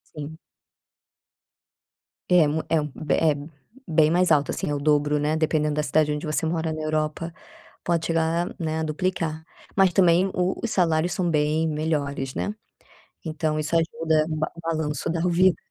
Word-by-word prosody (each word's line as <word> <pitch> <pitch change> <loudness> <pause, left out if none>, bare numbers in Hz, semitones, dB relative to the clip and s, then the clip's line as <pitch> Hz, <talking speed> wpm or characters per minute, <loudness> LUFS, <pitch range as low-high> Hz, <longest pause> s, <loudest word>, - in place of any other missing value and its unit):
Sim. 155 +1 -7 1.9
É 175 -4 +5
mu 155 +2 -1
é 165 - +3
um 150 - -2
be 150 -3 0
é, 155 -3 +3 0.5
bem 155 -1 +4
mais 180 -1 +3
alto, 145 -1 +3
assim, - - -3
é - - 0
o - - -2
dobro, 150 0 +2
né. 150 +2 0
Dependendo 155 -1 +1
da 150 - 0
cidade 150 +1 +2
onde 150 - -4
você 155 +1 -1
mora 160 0 -1
na 155 0 -4
Europa, 155 +2 -2 0.5
pode 170 -2 0
chegar, 165 +1 0
né, 160 -1 -2
a 160 - -1
duplicar. 160 0 -2 0.3
Mas 195 -2 +4
também 180 0 +4
o 180 +1 0
os 230 - -2
salários 170 -2 +1
são 180 -2 0
bem 155 +1 +1
melhores, 145 -4 -2
né? 205 - -2 0.7
Então 155 -1 -1
isso 155 +2 -2
ajuda 160 -1 +1
no 155 - -3
ba 155 - -1
no 170 - -10
balanço 160 -2 -2
da 165 -1 -1
vida. 180 -1 +3
160 Hz, 175 wpm, -24 LUFS, 150-165 Hz, 1.9 s, É